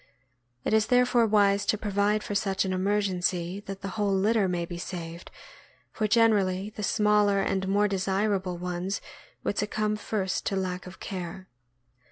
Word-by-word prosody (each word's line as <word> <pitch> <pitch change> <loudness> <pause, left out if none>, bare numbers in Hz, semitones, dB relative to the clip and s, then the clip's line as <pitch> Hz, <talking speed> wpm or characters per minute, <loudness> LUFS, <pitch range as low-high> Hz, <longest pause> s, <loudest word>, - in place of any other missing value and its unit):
It - - 0
is 220 0 +3
therefore 245 -1 +4
wise 200 -1 +3
to 215 - +2
provide 205 0 +1
for - - -4
such 195 -1 0
an 190 - -1
emergency, 185 -2 0
that 195 0 -6
the 195 - -3
whole 205 +1 -1
litter 205 +1 +2
may 175 -2 -1
be 170 0 -7
saved, 170 -1 -7 0.6
for 215 - -1
generally 210 -3 +3
the 210 - -7
smaller 210 -1 +3
and 190 -1 0
more 205 +2 +3
desirable 195 -1 0
ones 180 +2 -3 0.4
would 205 - -1
succumb 215 +1 0
first 195 -3 -2
to 195 - 0
lack 185 -1 -3
of 185 - -11
care. 185 0 -6
195 Hz, 160 wpm, -27 LUFS, 185-210 Hz, 0.6 s, therefore